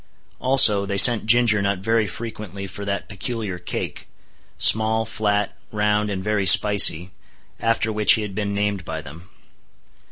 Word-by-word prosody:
Also, 125 Hz, -6 st, +3 dB
they 100 Hz, 0 st, -5 dB
sent 110 Hz, 0 st, +5 dB
Ginger 115 Hz, -2 st, +3 dB
Nut 100 Hz, 0 st, -2 dB
very 110 Hz, +3 st, -2 dB
frequently 100 Hz, -1 st, -9 dB
for 95 Hz, +2 st, -10 dB
that 100 Hz, 0 st, -5 dB
peculiar 105 Hz, -2 st, -7 dB
cake—small, 110 Hz, +4 st, -1 dB
flat, 105 Hz, -2 st, -3 dB, 0.2 s
round, 105 Hz, 0 st, -2 dB
and 95 Hz, -2 st, -6 dB
very 105 Hz, -2 st, -2 dB
spicy—after 105 Hz, +4 st, +2 dB
which 105 Hz, -2 st, +4 dB
he 110 Hz, -, -2 dB
had 105 Hz, -2 st, -8 dB
been 100 Hz, 0 st, -5 dB
named 100 Hz, -1 st, -4 dB
by 80 Hz, -1 st, -7 dB
them. 80 Hz, +4 st, -14 dB
105 Hz, 135 wpm, -20 LUFS, 100-110 Hz, 0.2 s, sent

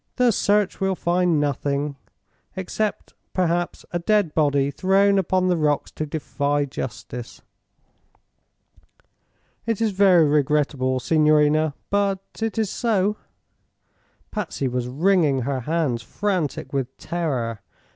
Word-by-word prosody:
The 250 Hz, -1 st, +4 dB
search 205 Hz, -1 st, +1 dB
will 190 Hz, 0 st, +1 dB
find 175 Hz, -2 st, +1 dB
nothing, 145 Hz, 0 st, -1 dB, 0.6 s
except 200 Hz, +3 st, -3 dB, 0.2 s
perhaps 175 Hz, -1 st, -1 dB
a 175 Hz, -, -1 dB
dead 200 Hz, -2 st, +1 dB
body 145 Hz, -2 st, +2 dB
thrown 195 Hz, +4 st, +3 dB
upon 185 Hz, 0 st, +1 dB
the 180 Hz, -, +3 dB
rocks 150 Hz, -2 st, 0 dB
to 155 Hz, -, -4 dB
defy 145 Hz, -1 st, -1 dB
justice. 125 Hz, -2 st, -7 dB, 2.2 s
It 225 Hz, -3 st, 0 dB
is 225 Hz, -2 st, +1 dB
very 185 Hz, -4 st, +5 dB
regrettable, 145 Hz, -3 st, +1 dB
signorina; 155 Hz, +1 st, +3 dB, 0.2 s
but 200 Hz, -1 st, +2 dB, 0.2 s
it 225 Hz, -1 st, -2 dB
is 220 Hz, -3 st, 0 dB
so." 210 Hz, -3 st, 0 dB, 1.1 s
Patsy 210 Hz, -9 st, -3 dB
was 125 Hz, -1 st, -2 dB
wringing 150 Hz, -1 st, +2 dB
her 135 Hz, +2 st, -2 dB
hands, 145 Hz, -3 st, -1 dB
frantic 180 Hz, -, -2 dB
with 135 Hz, -3 st, -3 dB
terror. 130 Hz, -, -3 dB
160 Hz, 115 wpm, -23 LUFS, 140-195 Hz, 2.2 s, very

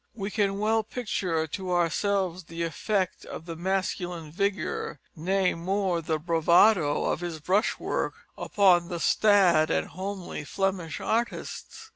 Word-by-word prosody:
We 200 Hz, -2 st, -4 dB
can 200 Hz, -2 st, 0 dB
well 220 Hz, +2 st, +2 dB
picture 195 Hz, -8 st, -2 dB
to 185 Hz, +4 st, -5 dB
ourselves 180 Hz, +1 st, 0 dB
the 165 Hz, +1 st, -5 dB
effect 185 Hz, +4 st, -1 dB
of 160 Hz, -, -8 dB
the 165 Hz, -1 st, -6 dB
masculine 180 Hz, -2 st, -2 dB
vigour, 190 Hz, -5 st, -2 dB, 0.2 s
nay, 185 Hz, +3 st, +1 dB
more, 185 Hz, 0 st, -1 dB
the 160 Hz, 0 st, -1 dB
bravado 170 Hz, 0 st, +3 dB
of -, -, 0 dB
his 170 Hz, -2 st, -5 dB
brush 190 Hz, +8 st, +1 dB
work -, -, -2 dB, 0.2 s
upon 180 Hz, -4 st, +3 dB
the 175 Hz, -2 st, -4 dB
staid 180 Hz, -5 st, +4 dB
and -, -, +1 dB
homely 190 Hz, -3 st, -5 dB
Flemish 185 Hz, -1 st, -2 dB
artists. 235 Hz, -, -3 dB
185 Hz, 135 wpm, -27 LUFS, 165-200 Hz, 0.2 s, staid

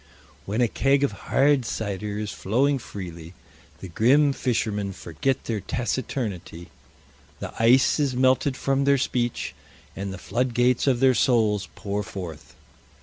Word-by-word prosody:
When 105 Hz, +5 st, 0 dB
a 120 Hz, -, +4 dB
keg 135 Hz, +4 st, +2 dB
of 140 Hz, -, +2 dB, 0.2 s
hard 140 Hz, -1 st, +4 dB
cider 105 Hz, -2 st, -4 dB
is 105 Hz, -1 st, -3 dB
flowing 135 Hz, +7 st, +1 dB
freely 85 Hz, -6 st, -9 dB, 0.5 s
the -, -, -6 dB
grim 135 Hz, -, +3 dB
fishermen 105 Hz, -6 st, -1 dB
forget 95 Hz, -, -2 dB
their 110 Hz, -2 st, -2 dB
taciturnity, 110 Hz, -9 st, -4 dB, 0.7 s
the -, -, -6 dB
ice 125 Hz, +6 st, +5 dB
is 140 Hz, -4 st, +1 dB
melted 130 Hz, +1 st, +2 dB
from 135 Hz, 0 st, 0 dB
their 140 Hz, 0 st, +4 dB
speech, 120 Hz, -2 st, -1 dB, 0.4 s
and 100 Hz, 0 st, -4 dB
the 95 Hz, -, -6 dB
floodgates 125 Hz, +5 st, +1 dB
of 130 Hz, -2 st, +2 dB
their 130 Hz, -1 st, +5 dB
souls 110 Hz, -5 st, +2 dB
pour 100 Hz, 0 st, -3 dB
forth. 90 Hz, -7 st, -8 dB
120 Hz, 140 wpm, -25 LUFS, 100-130 Hz, 0.7 s, ice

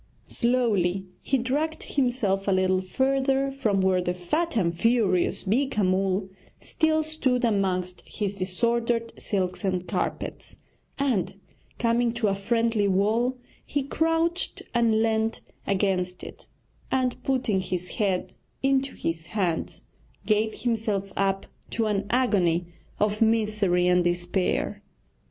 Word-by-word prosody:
Slowly 205 Hz, -7 st, +1 dB, 0.2 s
he 270 Hz, -, +1 dB
dragged 290 Hz, +6 st, -1 dB
himself 240 Hz, -8 st, 0 dB
a -, -, +3 dB
little 185 Hz, 0 st, +2 dB
further 270 Hz, +6 st, +1 dB
from 215 Hz, -8 st, 0 dB
where 185 Hz, -1 st, +3 dB
the 180 Hz, 0 st, -1 dB
fat 310 Hz, -, -1 dB
and 170 Hz, -5 st, +2 dB
furious 210 Hz, -3 st, +2 dB
Beeka 220 Hz, +1 st, +1 dB
Mull 190 Hz, +1 st, +1 dB, 0.3 s
still 315 Hz, -2 st, +1 dB
stood 270 Hz, -6 st, 0 dB
amongst 185 Hz, -4 st, 0 dB
his 205 Hz, -2 st, -3 dB
disordered 230 Hz, +5 st, 0 dB
silks 185 Hz, -1 st, -2 dB
and 185 Hz, -2 st, -1 dB
carpets, -, -, -3 dB, 0.4 s
and 255 Hz, -10 st, 0 dB, 0.4 s
coming 235 Hz, 0 st, +2 dB
to 235 Hz, -3 st, +1 dB
a -, -, +1 dB
friendly 225 Hz, +1 st, +1 dB
wall 220 Hz, +7 st, +1 dB, 0.3 s
he 285 Hz, -1 st, -2 dB
crouched 325 Hz, +4 st, 0 dB
and 225 Hz, -2 st, +3 dB
leant 220 Hz, 0 st, 0 dB, 0.3 s
against 185 Hz, -2 st, 0 dB
it, -, -, -10 dB, 0.4 s
and 255 Hz, -1 st, 0 dB
putting 255 Hz, -7 st, +1 dB
his 180 Hz, -1 st, -4 dB
head 195 Hz, -4 st, 0 dB, 0.3 s
into 270 Hz, 0 st, +1 dB
his 165 Hz, 0 st, -3 dB
hands 180 Hz, -6 st, -2 dB, 0.4 s
gave 215 Hz, 0 st, +1 dB
himself 215 Hz, -5 st, -1 dB
up 195 Hz, 0 st, 0 dB, 0.2 s
to 230 Hz, -, 0 dB
an 205 Hz, -2 st, 0 dB
agony 190 Hz, -9 st, +2 dB, 0.3 s
of 210 Hz, +1 st, +1 dB
misery 215 Hz, -5 st, +3 dB
and 180 Hz, 0 st, +4 dB
despair. 175 Hz, +3 st, 0 dB
215 Hz, 125 wpm, -26 LUFS, 185-245 Hz, 0.4 s, and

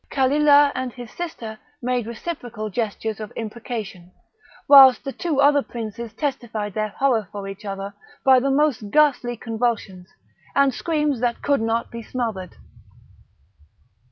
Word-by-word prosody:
Kalilah 285 Hz, +1 st, +4 dB
and 255 Hz, -1 st, -3 dB
his 240 Hz, -2 st, -10 dB
sister 230 Hz, -11 st, -6 dB, 0.2 s
made 245 Hz, -3 st, -1 dB
reciprocal 235 Hz, -4 st, -6 dB
gestures 220 Hz, 0 st, -3 dB
of 215 Hz, -1 st, -7 dB
imprecation, 215 Hz, -5 st, -6 dB, 0.6 s
whilst 270 Hz, -3 st, +8 dB
the 275 Hz, -, -4 dB
two 320 Hz, -2 st, -2 dB
other 285 Hz, 0 st, +5 dB
princes 230 Hz, -2 st, -7 dB
testified 235 Hz, -8 st, -3 dB
their 215 Hz, +2 st, -1 dB
horror 225 Hz, -3 st, 0 dB
for 200 Hz, -1 st, -6 dB
each 195 Hz, +2 st, -9 dB
other 195 Hz, 0 st, -5 dB, 0.3 s
by 260 Hz, -1 st, +7 dB
the 275 Hz, +2 st, 0 dB
most 270 Hz, -6 st, +1 dB
ghastly 260 Hz, -4 st, +2 dB
convulsions, 225 Hz, -6 st, -3 dB, 0.5 s
and 275 Hz, -1 st, +4 dB
screams 300 Hz, -3 st, -1 dB
that 240 Hz, -1 st, -1 dB
could 285 Hz, -4 st, +2 dB
not 225 Hz, +1 st, -1 dB
be 235 Hz, -, -6 dB
smothered. 220 Hz, -6 st, -4 dB
240 Hz, 135 wpm, -22 LUFS, 215-275 Hz, 0.6 s, whilst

